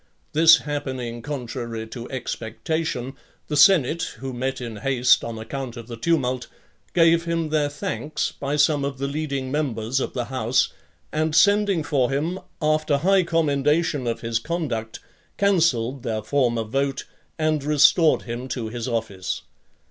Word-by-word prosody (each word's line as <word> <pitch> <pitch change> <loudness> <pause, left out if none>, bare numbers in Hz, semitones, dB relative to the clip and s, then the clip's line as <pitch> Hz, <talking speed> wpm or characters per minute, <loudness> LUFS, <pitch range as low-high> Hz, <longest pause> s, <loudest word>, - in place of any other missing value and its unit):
This 160 +1 +8
happening 130 -5 -4
contrary 120 -4 -5
to 120 +1 -7
expectation, 130 +2 -3 0.4
the 150 - -1
senate, 160 0 +4
who 130 +2 -6
met 130 +2 -2
in 115 -3 -6
haste, 125 +2 +3
on 115 -1 -5
account 120 +2 -6
of 115 - -8
the 120 0 -7
tumult, 130 -2 0 0.5
gave 165 0 +4
him 165 -1 -1
their 150 -2 +1
thanks 155 0 -3
by 140 +1 -3
some 150 -1 +3
of 140 -1 -3
the 135 - -2
leading 140 -2 -3
members 135 -4 -1
of - - -3
the 125 -2 -2
house, 125 0 0 0.4
and 155 0 0
sending 200 -1 +4
for 140 -4 +1
him, 155 +7 -1 0.2
after 155 -1 +2
high 190 +6 +4
commendation 150 -3 +1
of 115 - -2
his 115 -1 -1
conduct, 120 -7 -3 0.4
cancelled 155 - +2
their 110 -3 -3
former 120 -2 +1
vote, 135 +5 -2 0.3
and 155 -2 0
restored 150 +2 +4
him 120 +2 -5
to 120 -4 -4
his 120 +1 -5
office. 110 -6 -3
140 Hz, 150 wpm, -23 LUFS, 120-155 Hz, 0.5 s, This